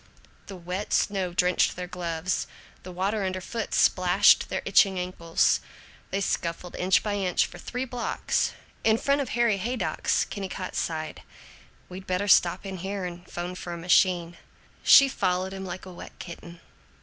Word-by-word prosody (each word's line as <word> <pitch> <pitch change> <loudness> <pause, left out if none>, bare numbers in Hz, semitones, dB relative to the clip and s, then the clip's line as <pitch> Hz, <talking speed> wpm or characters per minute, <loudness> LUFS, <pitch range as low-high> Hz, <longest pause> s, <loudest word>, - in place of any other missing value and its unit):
The 195 - -8
wet 180 +3 -5
snow 190 -3 +1
drenched 180 +1 +2
their 180 - -5
gloves; 175 -1 -3 0.3
the 185 - -9
water 195 +4 -1
underfoot 185 +5 -3
splashed - - +4
their - - -3
itching 195 -2 +4
ankles. 180 -2 +1 0.5
They 195 - -2
scuffled 175 -2 -3
inch 185 +1 +3
by 205 -1 -1
inch 185 -3 +1
for 175 - -11
three 250 +8 -4
blocks. 245 -1 -1 0.3
In 220 0 +4
front 280 +4 +1
of 265 - -4
Harry 235 -4 +3
Haydock's 225 0 -1
Kennicott 190 -2 -6
sighed: 155 -1 -3 0.7
"We 185 +1 -8
better 185 +1 -2
stop 180 -1 +4
in 190 -1 -5
here 190 +1 -4
and 175 0 -8
'phone 175 +1 -5
for 180 -1 -6
a - - -5
machine." 175 -1 +2 0.4
She 275 - +8
followed 185 -6 -1
him 190 0 -6
like 185 0 -7
a 185 - -10
wet - - -11
kitten. 170 -1 -10
185 Hz, 160 wpm, -26 LUFS, 175-200 Hz, 0.7 s, She